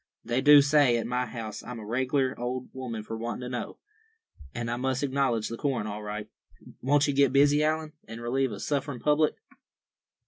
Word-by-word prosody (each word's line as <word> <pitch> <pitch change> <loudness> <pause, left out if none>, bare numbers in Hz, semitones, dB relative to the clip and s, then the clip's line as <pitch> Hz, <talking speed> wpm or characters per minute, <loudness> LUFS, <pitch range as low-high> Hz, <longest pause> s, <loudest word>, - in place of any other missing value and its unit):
They 120 +3 0
do 145 0 +8
say 140 -4 +4
at 115 - -2
my 125 +1 -1
house 110 -3 -6
I'm 125 -2 -8
a 110 - -8
reg'lar 130 +3 0
old 125 +1 -4
woman 120 -4 -5
for 115 - -6
wantin' 115 +1 -4
to 125 - -5
know; 125 -2 -5 0.7
and 120 +5 -4
I - - 0
must 130 +2 -1
acknowledge 130 -5 0
the 115 - -5
corn 135 -6 -1
all 105 0 -5
right. 105 0 -5 0.5
Won't 145 +2 +3
you 145 - +1
get 140 -1 +4
busy, 145 +2 +4
Allan, 155 0 -1
and 115 +1 -8
relieve 130 +2 0
a 100 - -6
sufferin' 140 -1 -2
public?" 150 +2 +2
130 Hz, 195 wpm, -28 LUFS, 115-140 Hz, 0.7 s, do